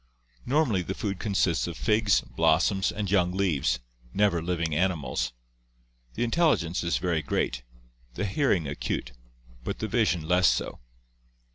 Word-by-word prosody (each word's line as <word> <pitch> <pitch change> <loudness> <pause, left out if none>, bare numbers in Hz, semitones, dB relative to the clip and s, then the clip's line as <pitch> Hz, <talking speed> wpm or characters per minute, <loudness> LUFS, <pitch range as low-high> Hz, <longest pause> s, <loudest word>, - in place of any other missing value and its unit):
Normally 130 - +2
the 95 +2 -4
food 100 -3 -3
consists 95 -6 +1
of 85 -2 -6
figs, 105 -3 +3
blossoms, 80 +9 +2
and 105 -3 -3
young 90 -3 +2
leaves, 80 -10 +1 0.4
never 100 -5 +2
living 85 -2 -1
animals. 75 -8 0 0.8
The 120 - 0
intelligence 120 - +1
is 85 - +1
very 85 -4 0
great, - - -1 0.5
the 100 - -2
hearing 100 - +1
acute, 60 -3 -3 0.5
but - - -3
the - - -3
vision 80 -1 +1
less 90 +1 +4
so. - - 0
90 Hz, 135 wpm, -27 LUFS, 80-100 Hz, 0.8 s, less